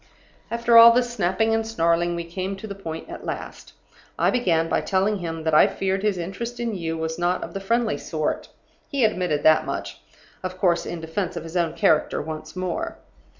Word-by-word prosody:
"After 235 0 +5
all 230 0 +11
this 245 0 +1
snapping 220 +2 +1
and 225 0 +1
snarling, 175 -5 +1
we 170 - -3
came 185 +3 -4
to 195 - -9
the 205 - -5
point 165 -5 -7
at - - -8
last. - - -7 0.4
I - - +3
began 170 -10 +1
by - - +1
telling 195 +2 +1
him 165 -2 -5
that 160 -1 0
I 155 - +7
feared 190 0 -1
his 210 -2 0
interest 215 +8 -5
in 235 -2 -2
you 165 -4 -3
was 160 +1 -3
not 175 +1 0
of - - -7
the 195 - -3
friendly 230 +3 0
sort. 155 -2 -3 0.4
He 275 -5 +2
admitted 180 -8 0
that 155 0 +5
much - - -5 0.4
of 185 0 -5
course, 175 -2 +1
in 170 - -5
defense 165 +3 -3
of 165 - -4
his 165 +1 -9
own 170 -3 +1
character 155 -1 +2
once 155 +1 -7
more. 185 -1 -3
185 Hz, 200 wpm, -24 LUFS, 165-215 Hz, 0.4 s, all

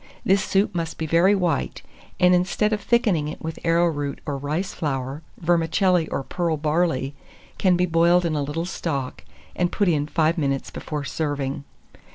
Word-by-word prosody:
This 195 0 +3
soup 195 +2 +1
must 165 -2 -3
be 160 - -3
very 170 +6 +4
white, 180 -4 -1 0.4
and 180 0 +5
instead 185 +4 +1
of 210 - -1
thickening 200 -11 +2
it 155 - -6
with 160 0 -6
arrowroot 165 -4 +1
or 145 - -2
rice 150 +7 -3
flour, 135 -1 -3 0.2
vermicelli 170 +1 +2
or 135 - -3
pearl 170 +1 -1
barley 150 -3 0 0.5
can 185 -2 +3
be 180 - +2
boiled 170 +1 +3
in 165 - 0
a 150 - 0
little 145 +4 -3
stock, 140 -7 -4 0.3
and 175 -1 0
put 205 - +1
in 150 -4 +1
5 160 +2 +1
minutes 135 -2 -1
before 150 -2 -5
serving. 145 -2 -3
165 Hz, 170 wpm, -23 LUFS, 145-180 Hz, 0.5 s, and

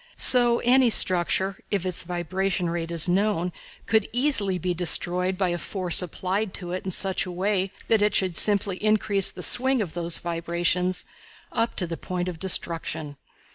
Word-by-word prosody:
So 240 -2 +5
any 250 0 +3
structure, 190 -1 +2
if 195 -3 -2
its 180 -1 0
vibration 180 +1 -2
rate 170 -1 -4
is 170 -1 +1
known, 180 -1 0 0.3
could 220 -1 0
easily 235 -7 0
be 180 +1 -3
destroyed 180 +2 +1
by 190 -2 0
a 175 0 -3
force 185 -2 +3
applied 185 +3 -4
to 175 -2 -7
it 185 - -5
in - - -3
such 190 +1 -1
a - - -6
way 190 +1 -1 0.2
that 225 -2 +2
it 210 -1 +1
should 185 -3 0
simply 200 0 +2
increase 205 -2 +2
the - - -9
swing 260 +1 +4
of 190 -7 -4
those 170 -1 0
vibrations 170 +2 -2 0.5
up 230 0 -2
to 180 - 0
the 165 -1 -6
point 180 -1 -5
of 175 -3 -6
destruction. 160 -5 0
185 Hz, 175 wpm, -24 LUFS, 175-205 Hz, 0.5 s, So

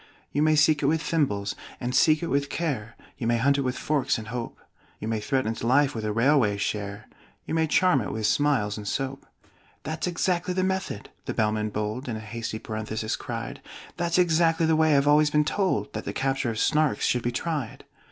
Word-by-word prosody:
"'You 145 - 0
may 155 0 +4
seek 150 0 +4
it 140 - +2
with 160 +2 +2
thimbles 115 -12 0 0.3
and 125 0 -3
seek 155 +4 +4
it - - -1
with 140 -2 0
care; 125 -10 -3 0.2
You 115 - -2
may 120 0 +3
hunt 140 +4 +2
it - - +2
with 130 -1 -2
forks 150 -3 0
and 110 -1 -7
hope; 120 0 -5 0.4
You 110 - -6
may 110 -1 -1
threaten 130 +1 0
its 115 - -6
life 140 +4 +3
with 110 - -4
a 105 - -1
railway 115 -2 +3
share; 100 0 -3 0.4
You - - -4
may 160 0 +2
charm 170 -3 +3
it 105 - -4
with 110 -1 -2
smiles 115 -5 +2
and 105 -1 -7
soap 135 +4 -3 0.3
'" - - -33
("That's 160 +3 -3
exactly 180 +1 0
the 185 - +1
method," 190 - -3
the - - -4
Bellman 105 0 +1
bold 105 +5 -3
In 115 - -2
a - - -5
hasty 110 +1 -5
parenthesis 110 0 -3
cried: - - -6 0.4
"That's 170 0 0
exactly 165 -2 +3
the 160 0 +3
way 160 0 +4
I - - +4
have 140 +1 +3
always 150 +1 +5
been 150 0 +2
told 195 +3 0
That - - -5
the - - -3
capture 135 -1 0
of 110 - -3
Snarks 150 +4 +2
should 125 - +1
be 120 - -1
tried!") 145 -2 -3
135 Hz, 220 wpm, -26 LUFS, 110-155 Hz, 0.4 s, always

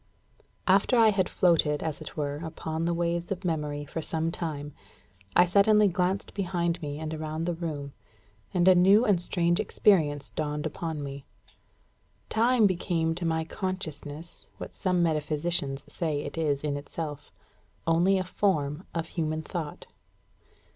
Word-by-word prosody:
After 195 +6 +4
I 225 -1 +7
had 195 -3 +1
floated, 160 -4 +2
as 155 -3 -3
it - - -8
were, 145 -1 -2
upon 160 0 -4
the 170 - +1
waves 170 +1 -1
of 190 0 -3
memory 150 -3 -2
for 165 - -5
some 160 +1 -1
time, 150 -4 -4 0.6
I 175 - +7
suddenly 205 +3 +5
glanced 185 +1 -1
behind 175 -3 -1
me 145 -2 -4
and 155 0 -4
around 155 +1 -3
the 175 - 0
room, 150 -5 -5 0.6
and 180 -1 +2
a 185 - +9
new 195 +6 +6
and 190 -4 +3
strange 175 -1 +1
experience 155 -10 +2
dawned 150 0 -3
upon 155 -1 -4
me. 140 0 -7 1.0
Time 235 0 +4
became 170 -3 +1
to 170 +1 -4
my 160 0 0
consciousness 165 -3 -6
what - - -8
some 180 -2 +1
metaphysicians 150 -2 -1
say 150 -4 -1
it - - -6
is 150 -4 0
in 145 -1 -1
itself 150 0 -6 0.5
only 170 +4 +3
a 185 - 0
form 175 -4 -1
of 165 -1 -1
human 160 -2 -2
thought. 160 -3 -5
165 Hz, 150 wpm, -28 LUFS, 150-180 Hz, 1.0 s, a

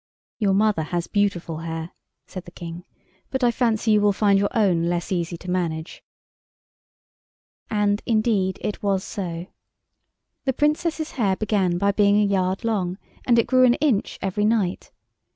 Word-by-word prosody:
"Your 200 -3 +2
mother 210 -4 +2
has 170 +2 -2
beautiful 185 -6 -1
hair," 165 0 -5 0.3
said 185 -1 -8
the - - -10
King; 170 0 -9 0.4
"but 265 -1 -2
I 240 - +4
fancy 225 -2 +1
you 210 -1 +4
will 205 0 +4
find 200 -1 +3
your 200 - +1
own 185 -7 +2
less 175 +1 -2
easy 175 -2 -2
to 180 - -13
manage." 165 -2 -3 1.7
And, 205 -1 +1
indeed, 215 -5 +1
it 210 - -3
was 195 -2 0
so. 175 -5 -5 1.0
The 265 - +1
Princess's 310 +3 0
hair 200 -7 +1
began 195 -4 0
by 200 +2 +2
being 205 0 +3
a 210 - +3
yard 190 0 0
long, 190 -5 -1 0.3
and 240 -2 +5
it 230 - +4
grew 255 +1 +4
an 245 -1 +5
inch 275 -9 0
every 195 +2 -1
night. 210 -5 0
200 Hz, 160 wpm, -23 LUFS, 175-220 Hz, 1.7 s, and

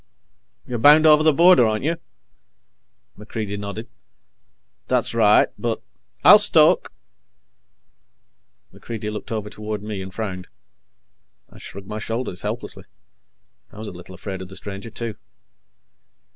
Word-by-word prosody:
"You're 120 -2 -4
bound 150 +5 +7
over 155 -1 +7
the 155 0 +5
border, 170 -1 +6
aren't 110 +1 0
you?" 165 +3 -1 1.2
MacReidie 105 -1 -6
nodded. 105 +3 -6 1.0
"That's - - 0
right. 110 -2 +4
But 115 +1 -2 0.2
" - - -40
"I'll - - +10
stoke." - - +4 1.8
MacReidie 110 -2 -6
looked 105 - -7
over 110 -2 -3
toward 105 -1 -6
me 105 -2 -5
and 95 0 -8
frowned. 95 -3 -5 1.0
I - - -15
shrugged 100 0 -10
my 105 +2 -6
shoulders 115 -4 -4
helplessly. 110 +3 -6 0.9
I - - -16
was 110 0 -6
a - - -9
little 90 +1 -12
afraid 95 0 -7
of 95 - -9
the 95 - -10
stranger, 100 +3 -8
too. 115 -1 -6
110 Hz, 130 wpm, -22 LUFS, 100-115 Hz, 1.8 s, I'll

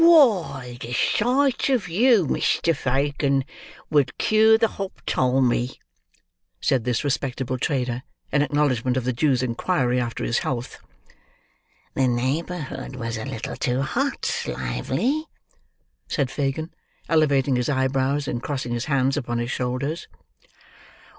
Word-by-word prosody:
"Why, 185 - +4
the 120 - -5
sight 255 - +2
of 250 -8 +1
you, 215 +2 +4
Mr. 165 +3 +1
Fagin, 140 +1 0 0.5
would 140 -4 +2
cure 220 +1 +5
the 225 - +3
hoptalmy!" 130 - 0 0.8
said 130 -5 +1
this 125 +1 0
respectable 130 -2 -2
trader, 125 -4 -1 0.3
in 145 - +3
acknowledgment 130 -4 +1
of 130 - 0
the 130 +1 0
Jew's 130 0 +2
inquiry 125 0 0
after 120 -1 -3
his 115 - +1
health. 125 -1 -4 1.1
"The 135 -1 +2
neighbourhood 135 +2 -2
was 115 -2 -4
a 110 - -5
little 115 - -5
too 125 +2 0
hot, - - -1
Lively," 130 - -1 0.8
said 135 -4 -1
Fagin, 145 +3 -2 0.4
elevating 140 -4 +3
his 125 +3 0
eyebrows, 135 +1 +1
and 120 - -2
crossing 130 -4 -3
his 120 0 -2
hands 135 -2 +1
upon 120 -4 -2
his 120 +1 -2
shoulders. 130 +6 -2
135 Hz, 125 wpm, -24 LUFS, 125-155 Hz, 1.1 s, cure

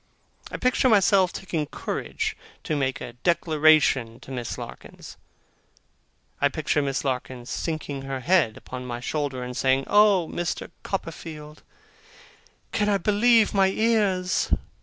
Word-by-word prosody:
I - - -5
picture 255 +1 +2
myself 195 -3 +4
taking 160 -5 -3
courage - - -4 0.3
to 155 - -2
make 135 -2 -1
a - - -7
declaration 155 -8 +3
to 135 - -11
Miss 120 -3 -4
Larkins. - - -10 1.3
I - - +4
picture 150 - 0
Miss 135 0 -2
Larkins 125 -2 -4
sinking 155 -4 -3
her 135 -1 -5
head 155 -8 +2
upon 125 0 -8
my 120 -1 -5
shoulder, 135 -1 -3
and 125 0 -6
saying, 135 +1 +2
'Oh, 205 -5 +4
Mr. 175 +1 -4
Copperfield, 155 -4 -6 1.1
can 210 -1 +1
I 200 - +3
believe 215 +3 +3
my 195 -1 +4
ears! 195 -3 +1
155 Hz, 130 wpm, -25 LUFS, 135-195 Hz, 1.3 s, myself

